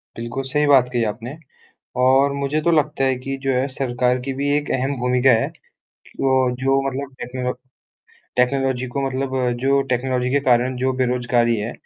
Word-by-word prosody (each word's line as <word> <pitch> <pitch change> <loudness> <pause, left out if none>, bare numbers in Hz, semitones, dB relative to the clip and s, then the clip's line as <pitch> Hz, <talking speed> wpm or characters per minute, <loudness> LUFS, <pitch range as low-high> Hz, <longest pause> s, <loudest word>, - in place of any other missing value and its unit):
बिल्कुल, 120 +3 -4
सही 150 +3 0
बात 130 -3 +5
कही 120 -1 +1
आपने। 115 +7 -5 0.7
और 135 +2 +4
मुझे 140 +2 -1
तो 170 - +2
लगता 150 -3 +1
है 130 -1 +2
कि 135 +1 -4
जो 135 - +1
है 130 +2 +1
सरकार 125 -1 0
की 135 +1 -4
भी 140 +1 -2
एक 150 - -3
अहम 135 +2 -1
भूमिका 125 +1 +3
है। 115 -2 +3 0.7
वो 135 - +2 0.3
जो 135 +1 +2
मतलब 135 +1 -5
टेक्नोलॉ 125 +1 -3 0.8
टेक्नोलॉजी 130 0 +1
को 130 +3 -4
मतलब 135 0 -2 0.3
जो 140 +1 +3
टेक्नोलॉजी 125 0 0
के 140 +1 +2
कारण 125 0 +2
जो 130 +1 0
बेरज़गारी 120 -2 +1
है, 105 +3 -3
130 Hz, 170 wpm, -21 LUFS, 125-135 Hz, 0.8 s, बात